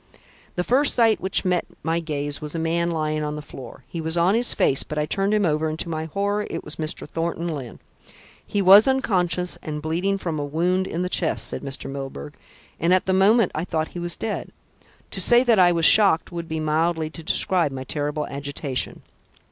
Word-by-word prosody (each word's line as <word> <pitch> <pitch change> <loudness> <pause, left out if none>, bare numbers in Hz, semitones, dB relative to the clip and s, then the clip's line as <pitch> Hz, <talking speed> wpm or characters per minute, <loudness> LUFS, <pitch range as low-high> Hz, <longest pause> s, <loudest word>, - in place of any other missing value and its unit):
"The 180 - 0
first 270 +8 +3
sight 225 -2 +3
which 190 +1 0
met 180 -1 +1 0.2
my 165 +1 0
gaze 145 -3 -3
was 150 +1 -6
a - - -1
man 170 +1 0
lying 155 -2 -1
on 150 0 -3
the 150 - -6
floor. 135 -2 -11
He 165 +5 -6
was 160 +1 -1
on 175 +3 +3
his 240 +2 +2
face, 135 - +2
but 150 - -6
I 150 - +1
turned 195 +5 0
him 210 -2 +2
over, 155 -1 0
and 155 - -4
to 170 - -2
my 160 -1 -3
horror 200 +5 -2
it - - -5
was 150 - -5
Mr. 155 -1 -3
Thornton 165 +2 -3
Lyne. 140 -8 -6 0.7
He 200 -1 -1
was 195 +5 +8
unconscious 180 -9 0
and 150 -1 -5
bleeding 175 +6 -1
from 165 -5 -4
a - - -2
wound 175 +6 0
in 170 +2 -3
the - - -1
chest," 175 -2 -1
said - - -5
Mr. 135 -1 -3
Milburgh, 135 - -7 0.5
"and 170 +3 +3
at 185 - 0
the 190 - +1
moment 200 +2 +4
I 155 - -2
thought 160 -3 -2
he 175 - -7
was 175 0 -1
dead. 220 - -4 0.6
To - - -4
say 240 +1 +4
that 235 -5 +3
I 175 -1 +6
was 165 -2 +1
shocked 195 -5 +4
would 170 -1 -5
be 160 0 -2
mildly 155 +1 0
to 165 - -10
describe 170 -1 +3
my 130 -1 -6
terrible 150 +2 -3
agitation. 140 -1 -4
165 Hz, 215 wpm, -23 LUFS, 150-185 Hz, 0.7 s, was